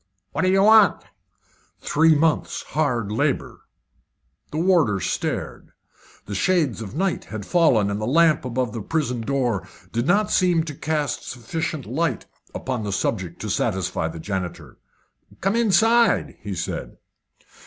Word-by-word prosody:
"What - - -2
do 185 - +2
you 195 +1 +4
want?" 215 -1 +6 0.8
"Three 160 +1 +3
months' 155 +1 0
hard 125 -9 -1
labour." 110 - -2 0.8
The 150 - -5
warder 160 - +3
stared. 80 - -3 0.5
The 105 - -6
shades 145 - +1
of 110 +2 -7
night 190 +3 -1
had 110 -3 -7
fallen, 125 - +3
and 100 +1 -3
the 110 - -2
lamp 160 +2 +4
above 125 -2 -2
the 115 - -4
prison 125 -2 -2
door 120 -4 -1 0.2
did 120 +4 -1
not 205 +4 +2
seem 175 -3 +3
to 155 -2 -6
cast 150 -2 -2
sufficient 145 +4 -4
light 135 +2 -1 0.3
upon 125 -4 -3
the 100 - -3
subject 95 -3 -2
to 110 - -4
satisfy 95 -6 -1
the 80 +1 -7
janitor. 95 0 -5 0.6
"Come 195 +4 0
inside," 230 +1 +3
he 100 -2 -5
said. - - -5
135 Hz, 145 wpm, -23 LUFS, 105-170 Hz, 0.8 s, want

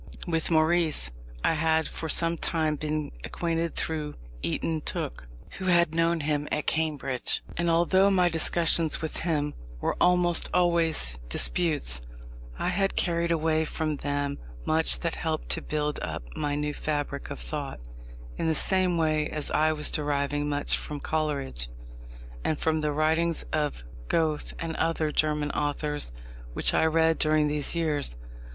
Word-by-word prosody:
With 165 -3 -1
Maurice 160 - +2 0.3
I - - +3
had 160 0 +1
for 160 - -6
some 165 +1 +3
time 160 -2 -1
been 150 0 -3
acquainted 165 -1 -2
through 155 -2 -2 0.3
Eyton 155 - -1
Tooke, - - -4 0.3
who 190 - -4
had 170 -3 +3
known 165 0 +2
him 150 0 -1
at 150 - -1
Cambridge, 150 -5 -1
and 170 0 0
although 180 +4 +4
my 185 -2 +3
discussions 165 -1 +4
with 160 - -3
him 150 -3 -1 0.3
were - - -1
almost 180 -1 +4
always 165 - +3
disputes, 145 - +1 0.6
I - - -1
had 195 +1 0
carried 170 -1 0
away 160 -1 +1
from 155 -1 -2
them 145 0 -2 0.3
much 160 +1 +4
that 170 -2 -1
helped 160 -1 -3
to - - +2
build 150 -1 -2
up - - -4
my 145 -1 -1
new 150 0 -2
fabric 145 -2 -3
of - - -6
thought, - - -5 0.6
in - - -1
the 160 - +2
same 185 -1 +3
way 155 -2 +1
as 150 -1 -2
I 155 +1 +3
was 150 -1 0
deriving 145 -1 0
much 145 0 +2
from 150 -1 -6
Coleridge, 140 - -1 0.7
and 155 - 0
from 160 -1 +1
the 150 -1 0
writings 160 +2 +1
of 150 - -1 0.2
Goethe 155 - 0
and 165 -1 -4
other 160 -1 0
German 150 -1 0
authors 150 - -1 0.4
which - - +1
I 160 - +3
read 160 0 +2
during 155 -1 +3
these 150 +2 0
years. 150 - 0
155 Hz, 150 wpm, -27 LUFS, 150-165 Hz, 0.7 s, although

